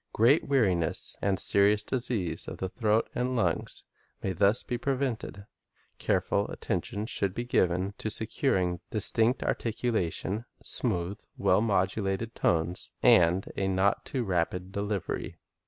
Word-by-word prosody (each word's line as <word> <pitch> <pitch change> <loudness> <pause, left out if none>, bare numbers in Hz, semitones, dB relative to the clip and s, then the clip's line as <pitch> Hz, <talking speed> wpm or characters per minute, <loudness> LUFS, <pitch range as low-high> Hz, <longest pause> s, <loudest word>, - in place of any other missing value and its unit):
Great 125 +8 +4
weariness 95 - +1
and 95 -2 +1
serious 100 +3 +5
dis 125 +1 0
ease 100 -9 -2
of - - -6
the 95 - -3
throat 110 +2 +1
and 125 +1 -1
lungs 90 -9 -1 0.4
may 95 - -1
thus 100 +5 +3
be 125 - -3
prevented. 125 -6 -3 0.5
Careful - - 0
attention 105 +1 -3
should 100 -4 -2
be 120 - -2
given 95 -4 +1
to 110 - -2
securing 100 -5 +1
distinct 115 +3 +2
articulation, 110 -2 -2
smooth, 90 +3 -2 0.2
well - - +3
modulated 100 +1 0
tones, 85 +1 0
and 90 +2 +5
a 95 - -1
not 95 +1 +1
too 130 -3 -3
rapid 90 -1 -2
delivery. 100 -1 -3
100 Hz, 130 wpm, -28 LUFS, 95-115 Hz, 0.5 s, serious